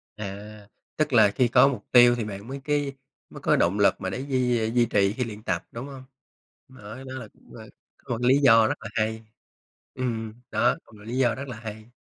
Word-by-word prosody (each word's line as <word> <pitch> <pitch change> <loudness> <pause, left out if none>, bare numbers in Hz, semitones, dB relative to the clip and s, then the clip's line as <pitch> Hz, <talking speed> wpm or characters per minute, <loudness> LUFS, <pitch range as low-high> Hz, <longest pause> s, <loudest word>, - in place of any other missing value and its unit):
À, 105 0 -8 0.3
tức 155 -2 0
là 110 -4 +6
khi 125 +4 +2
có 130 +3 +5
mục 140 - -3
tiêu 120 -1 +7
thì 120 - -3
bạn 100 0 -8
mới 135 +1 -7
cái 145 -1 -1 0.4
mới - - -11
có - - +3
động 95 +5 +1
lực 100 - +3
mà 95 - -2
để 120 - -4
duy 125 -4 0
duy 120 0 +3
trì 100 -3 +1
khi 125 +3 -2
luyện 110 -2 -8
tập, 85 -2 -2
đúng 115 +3 -7
hông? 135 -2 -10 0.6
Đó 110 -4 -11
đó, 130 -1 -8
là 130 -4 -7
cũng - - -21
là, - - -10 0.3
có - - -11
một - - -8
lý 130 +3 +4
do 115 -5 +6
rất - - -2
là 115 - -7
hay. 110 0 -2 0.7
Ừm, 115 -4 -3 0.2
đó, - - +2
một - - -21
lý 120 +3 -4
do 125 -3 +2
rất 140 +1 -7
là 125 -4 -7
hay. 110 0 -9
115 Hz, 225 wpm, -25 LUFS, 110-130 Hz, 0.7 s, tiêu